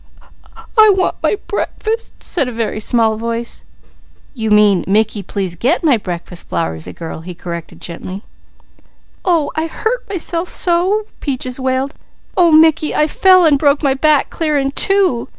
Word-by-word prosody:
"I 435 0 +8
want 370 - 0
my - - +1
breakfast," 445 +2 -4
said 280 -9 -1
a - - -6
very 225 -2 -3
small 220 0 +1
voice. 230 +1 -4 0.7
"You 220 -4 -3
mean, 210 -3 +4
'Mickey, 210 +1 +1
please 190 -1 -3
get 255 - 0
my 295 -6 +4
breakfast,' 175 -4 -6
Flowersy 80 0 -3
girl," 160 - -8
he 180 +1 -9
corrected 170 -1 -7
gently. 185 +4 -8 1.0
"Oh 335 -5 +1
I 315 +1 -1
hurt 450 +8 -3
myself 350 -2 -1
so!" 370 +4 +2
Peaches 255 -2 -4
wailed. 260 +2 -1 0.4
"Oh 345 -2 +4
Mickey, 315 -1 +4
I 300 - +3
fell 370 +3 +4
an' 300 -3 +5
broke 285 +1 +2
my 275 -2 +3
back 295 +1 +2
clear 305 -3 0
in 275 -1 0
two. 370 -7 +2
270 Hz, 150 wpm, -16 LUFS, 210-335 Hz, 1.0 s, I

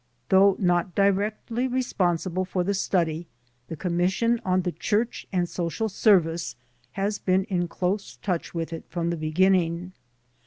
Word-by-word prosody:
Though 195 0 +6
not 175 -2 +1
directly 210 +5 +1
responsible 185 -8 0
for 185 -1 -1
the 200 +3 0
study, 170 -4 0 0.4
the 165 - -5
Commission 185 +8 +1
on 185 0 +1
the 180 - -1
Church 210 +8 -1
and 180 -3 +1
Social 175 +6 -2
Service 175 -5 +2 0.4
has 200 +1 -1
been 185 0 +2
in 180 -3 -1
close 190 +4 -2
touch 180 -5 -3
with 165 0 -4
it 165 - -7
from 170 -1 -1
the - - -1
beginning. 170 +2 +1
185 Hz, 145 wpm, -25 LUFS, 170-200 Hz, 0.4 s, Though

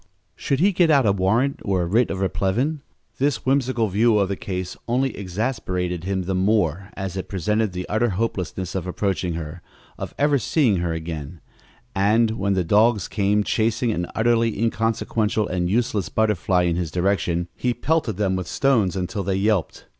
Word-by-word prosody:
Should 135 - -1
he 195 +5 +4
get 175 -3 +3
out 140 -5 +4
a - - +4
search 100 - +1
warrant 115 +9 +1
or 95 -3 0
a - - -1
writ 110 +8 +2
of 95 - -3
replevin? 120 +11 0 0.4
This 140 +1 0
whimsical 130 -4 +1
view 105 +3 +3
of 100 -2 +1
the 100 - -1
case 90 -1 -5
only 130 +3 0
exasperated 90 -4 -3
him 95 -1 -1
the 95 +2 -2
more 95 -1 +1
as 95 -2 -4
it 95 - -5
presented 105 +3 0
the 90 0 -5
utter 115 +3 +1
hopelessness 95 -3 -3
of 95 -1 -3
approaching 95 -2 -1
her 80 +1 -6 0.4
of - - -6
ever 145 -1 +3
seeing 125 - +2
her 85 -1 -1
again 80 -1 -5 0.5
and, 110 +4 +3
when 100 -3 0
the 95 - +1
dogs 105 +3 +3
came 105 0 +1
chasing 115 +2 0
an 90 -4 -2
utterly 115 -1 +2
inconsequential 115 -1 0
and 90 -1 -1
useless 110 -2 0
butterfly 95 -4 +1
in 85 -1 0
his 90 -3 -2
direction, 90 -1 0
he 125 - 0
pelted 135 - 0
them 95 -3 +1
with 90 -2 -3
stones 115 -6 +2
until 95 +2 -2
they 95 0 -1
yelped. 100 -2 0
100 Hz, 180 wpm, -23 LUFS, 90-115 Hz, 0.5 s, he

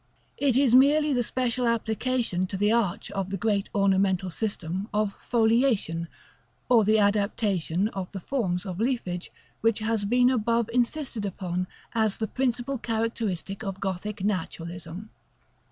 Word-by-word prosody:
It 270 -4 +3
is 265 -4 +4
merely 290 +3 +5
the 245 - +2
special 245 0 0
application 230 -4 0
to 190 - -4
the 205 +2 +2
arch 220 -4 0
of 195 -2 -3
the 195 - -2
great 205 0 0
ornamental 190 -2 +2
system 190 -1 -3
of 210 -1 0
FOLIATION; 225 -8 +2 0.6
or 235 -3 +6
the 215 +2 +4
adaptation 200 -3 +1
of 190 -4 -6
the 195 - -5
forms 185 -5 -1
of 185 -1 -5
leafage 220 -8 -2 0.3
which 225 -1 +3
has 220 -1 -1
been 245 +4 +4
above 230 -1 +1
insisted 250 -2 -1
upon 185 -2 -3 0.3
as 220 -3 +1
the 220 - -2
principal 255 +2 -1
characteristic 220 -4 -2
of 195 -2 -4
Gothic 195 +2 -3
Naturalism. 175 0 -4
215 Hz, 140 wpm, -27 LUFS, 190-235 Hz, 0.6 s, or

